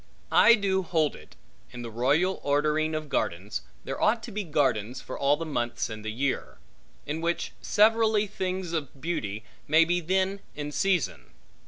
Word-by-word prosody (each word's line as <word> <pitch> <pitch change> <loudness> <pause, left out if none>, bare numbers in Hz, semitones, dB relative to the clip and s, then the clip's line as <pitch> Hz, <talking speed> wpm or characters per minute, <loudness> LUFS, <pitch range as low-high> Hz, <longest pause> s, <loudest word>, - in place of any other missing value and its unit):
I 235 - +7
do 195 -3 +1
hold 160 -4 0
it, - - -15 0.3
in 125 -1 -8
the 115 - -6
royal 145 - +2
ordering 150 +2 +1
of 155 -1 -3
gardens, 100 -4 -2 0.2
there 135 - -5
ought 225 +1 +3
to 230 - -7
be 210 0 -3
gardens, 130 - 0
for - - -7
all 140 +1 +2
the 165 - -4
months 120 -6 -2
in 110 0 -6
the 110 0 -4
year; 135 +4 -2 0.5
in 155 +3 -3
which 170 +1 -1
severally 220 0 +4
things 185 -3 -3
of 145 -4 -4
beauty 110 -10 -3 0.2
may 155 +2 +6
be 175 +1 +1
then 190 +3 0 0.2
in 150 0 -4
season. 145 - 0
155 Hz, 170 wpm, -27 LUFS, 130-190 Hz, 0.5 s, I